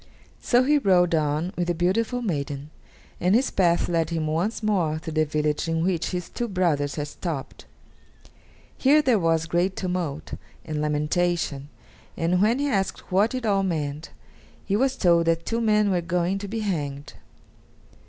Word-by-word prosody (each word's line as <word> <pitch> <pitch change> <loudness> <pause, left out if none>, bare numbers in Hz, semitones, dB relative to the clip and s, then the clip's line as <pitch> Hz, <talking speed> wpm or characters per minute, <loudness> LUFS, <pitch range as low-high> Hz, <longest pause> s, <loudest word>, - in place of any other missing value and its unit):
So 245 0 +3
he 295 +3 +3
rode 180 -7 +3
on 155 +3 0
with 175 -1 -1
the 175 - 0
beautiful 225 +8 0
maiden, 145 -6 -3 0.5
and 180 +4 +3
his 260 +3 +2
path 175 -3 +2
led 165 -2 0
him 165 -2 -2
once 170 +9 -1
more 180 -8 +1
through 160 0 -7
the 155 0 +2
village 150 +1 -1
in 165 0 0
which 175 -2 0
his 180 -1 -4
two 240 - -4
brothers 165 -8 0
had 150 -1 -3
stopped. 150 -2 -6 1.1
Here 295 +3 +5
there 245 -6 +3
was 165 -2 +1
great 175 +3 0
tumult 175 -6 -3 0.3
and 155 -1 -3
lamentation, 150 -1 -1 0.5
and 180 +2 +1
when 220 +4 +3
he 285 +1 0
asked 195 -6 -2
what 205 +7 +2
it 255 -2 -3
all 200 -2 +2
meant, 155 -4 -3 0.6
he 200 - 0
was 265 +4 +1
told 170 -6 +3
that 165 0 +1
two 230 0 -1
men 210 -2 +3
were 180 -2 +1
going 175 +2 -1
to 200 - -6
be 220 +2 -3
hanged. 145 -8 -3
175 Hz, 170 wpm, -25 LUFS, 155-205 Hz, 1.1 s, Here